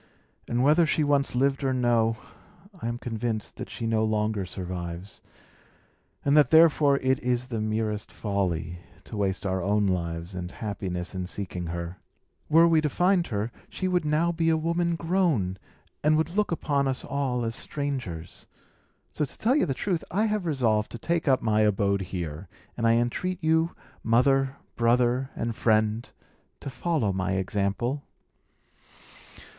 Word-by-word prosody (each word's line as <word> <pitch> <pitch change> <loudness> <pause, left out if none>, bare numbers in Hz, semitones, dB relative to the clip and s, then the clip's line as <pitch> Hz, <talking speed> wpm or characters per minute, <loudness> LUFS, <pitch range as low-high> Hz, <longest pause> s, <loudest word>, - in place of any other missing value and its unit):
And 120 +1 0
whether 155 +4 +5
she 155 - +1
once 140 -3 +1
lived 135 +2 +1
or 130 -1 +1
no, 115 -2 +2 0.6
I - - -2
am 120 0 -2
convinced 115 -2 -4
that - - -6
she 105 +3 -5
no 110 -1 +1
longer 105 -2 0
survives, 90 0 -6 1.0
and 140 +1 +4
that 150 -5 +6
therefore 155 -3 +6
it 130 0 +2
is 125 0 0
the 110 - -1
merest 110 -1 -2
folly 90 -5 -2 0.2
to - - -9
waste 100 -1 -1
our 95 -1 0
own 100 +2 +2
lives 85 -1 -2
and 90 -1 -5
happiness 95 -4 -4
in 90 -1 -4
seeking 90 -3 -5
her. 85 +2 -5 0.5
Were 165 +2 +6
we 165 -2 +4
to 150 - 0
find 180 +3 +2
her, 105 +2 -2 0.2
she 185 - -3
would 180 -2 +1
now 155 +3 +2
be 165 -1 +1
a 160 - +3
woman 170 +1 0
grown, 165 - 0 0.4
and 155 +1 +4
would 160 +1 0
look 210 -2 +1
upon 140 -4 0
us 130 -1 -2
all 130 -4 -1
as 115 0 -2
strangers. 125 - -4 0.6
So, 150 - -2
to 140 - -5
tell 245 +5 +2
you 295 - +2
the 135 - -1
truth, 175 +4 -1
I 210 +5 +1
have 210 -4 -1
resolved 115 -8 +1
to - - -4
take 165 +7 -1
up 130 -2 +3
my 110 -1 +2
abode 100 -2 +2
here; 90 -2 -5 0.3
and 115 -1 +1
I 115 - +5
entreat 120 +11 0
you, 160 +1 +2 0.3
mother, 135 +3 +3 0.2
brother, 120 +2 +2
and 115 -1 -2
friend, 110 +1 +1 0.5
to 140 - -6
follow 135 - 0
my 95 0 -1
example." 100 +8 -1
120 Hz, 160 wpm, -27 LUFS, 100-150 Hz, 1.0 s, that